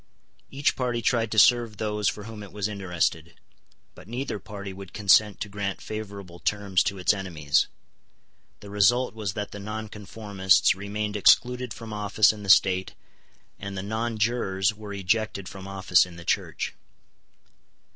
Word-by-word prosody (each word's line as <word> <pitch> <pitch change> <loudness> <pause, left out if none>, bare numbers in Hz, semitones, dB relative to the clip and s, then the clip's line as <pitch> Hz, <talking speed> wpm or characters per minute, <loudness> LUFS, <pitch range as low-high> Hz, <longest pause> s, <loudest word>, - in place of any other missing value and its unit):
Each 140 +1 0
party 125 -2 -1
tried 115 0 +1
to 110 - -3
serve 115 -1 +5
those 105 -1 0
for 105 - -6
whom 110 0 -9
it 100 - -10
was 105 -1 -2
interested: 90 -5 -2 0.5
but - - -15
neither 120 -1 -4
party 100 0 -8
would 95 -1 -11
consent 105 0 +4
to - - -2
grant 100 -1 -4
favourable 100 -5 -7
terms 100 -2 +1
to 100 - -1
its 90 0 +3
enemies. 85 -7 0 0.9
The 100 - -10
result 105 +5 +3
was 105 -4 -4
that 105 -1 -4
the 100 - -8
nonconformists 105 -2 +1
remained 105 +2 -4
excluded 125 +4 +4
from 115 -1 -8
office 105 +1 +3
in 105 - -10
the 100 - -7
State, 95 -1 +4 0.6
and 100 -1 -6
the 95 - -4
nonjurors 110 -2 0
were 105 -1 -9
ejected 100 0 -1
from 95 -1 -9
office 95 -2 +3
in 90 - -12
the 85 0 -11
Church. - - -1
105 Hz, 155 wpm, -26 LUFS, 95-110 Hz, 0.9 s, serve